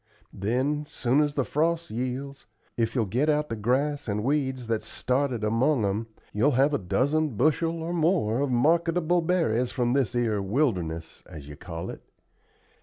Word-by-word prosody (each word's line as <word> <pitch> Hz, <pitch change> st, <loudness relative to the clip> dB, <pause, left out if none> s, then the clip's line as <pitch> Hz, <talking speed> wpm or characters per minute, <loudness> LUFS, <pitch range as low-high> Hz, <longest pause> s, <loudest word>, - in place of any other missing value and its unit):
Then, 130 Hz, +9 st, 0 dB
soon 130 Hz, +3 st, +1 dB
as 145 Hz, -1 st, 0 dB
the 135 Hz, -, +1 dB
frost 165 Hz, +1 st, 0 dB
yields, 130 Hz, +4 st, -4 dB, 0.3 s
if 115 Hz, +1 st, -1 dB
you'll 115 Hz, -4 st, +2 dB
get 125 Hz, +10 st, 0 dB
out 150 Hz, 0 st, +1 dB
the 115 Hz, -, -2 dB
grass 135 Hz, +7 st, 0 dB
and 105 Hz, 0 st, -1 dB
weeds 130 Hz, -2 st, 0 dB
that's 115 Hz, -1 st, -2 dB
started 130 Hz, -3 st, -1 dB
among 115 Hz, +3 st, +2 dB
'em, 105 Hz, +3 st, -1 dB, 0.3 s
you'll 130 Hz, +8 st, +3 dB
have 140 Hz, +3 st, +4 dB
a -, -, +1 dB
dozen 140 Hz, -, 0 dB
bushel 165 Hz, +3 st, +1 dB
or 170 Hz, +2 st, -3 dB
more 160 Hz, -, +1 dB
of 140 Hz, 0 st, 0 dB
marketable 165 Hz, +6 st, +2 dB
berries 160 Hz, -9 st, +1 dB
from 120 Hz, -2 st, 0 dB
this 130 Hz, -3 st, +1 dB
'ere 110 Hz, -4 st, +1 dB
wilderness, 95 Hz, -, -1 dB
as 75 Hz, -2 st, -10 dB
you 75 Hz, -, -9 dB
call 80 Hz, +1 st, -6 dB
it. -, -, -10 dB
130 Hz, 170 wpm, -26 LUFS, 110-150 Hz, 0.3 s, have